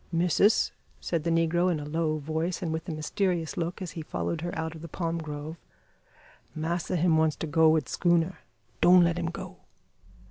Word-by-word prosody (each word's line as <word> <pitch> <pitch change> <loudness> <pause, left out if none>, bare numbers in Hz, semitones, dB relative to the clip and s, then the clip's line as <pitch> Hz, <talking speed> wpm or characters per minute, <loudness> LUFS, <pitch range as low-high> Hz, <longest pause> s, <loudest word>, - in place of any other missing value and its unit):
"Missis," 180 +5 +3 0.3
said 165 -3 -2
the 170 - 0
negro, 165 +2 +2
in 160 - -1
a 145 - -6
low 155 0 -1
voice, 160 +5 -2
and 160 -2 -1
with 160 +3 -4
a - - -1
mysterious 165 +2 -1
look, 175 +2 -3
as 175 - -6
he 165 - -6
followed 160 +1 -3
her 175 - -3
out 160 0 -3
of 160 - -10
the 170 - -7
palm 165 0 -3
grove, 155 +1 -6 1.0
"massa 170 +3 -2
him 165 -1 +3
wants 160 -1 +2
to - - -4
go 160 +1 +4
wid 155 -4 +2
schooner. 175 0 +1 0.4
Don' 180 0 +7
let 170 0 +1
him 170 - -1
go." 185 +1 -8
165 Hz, 190 wpm, -28 LUFS, 160-175 Hz, 1.0 s, Don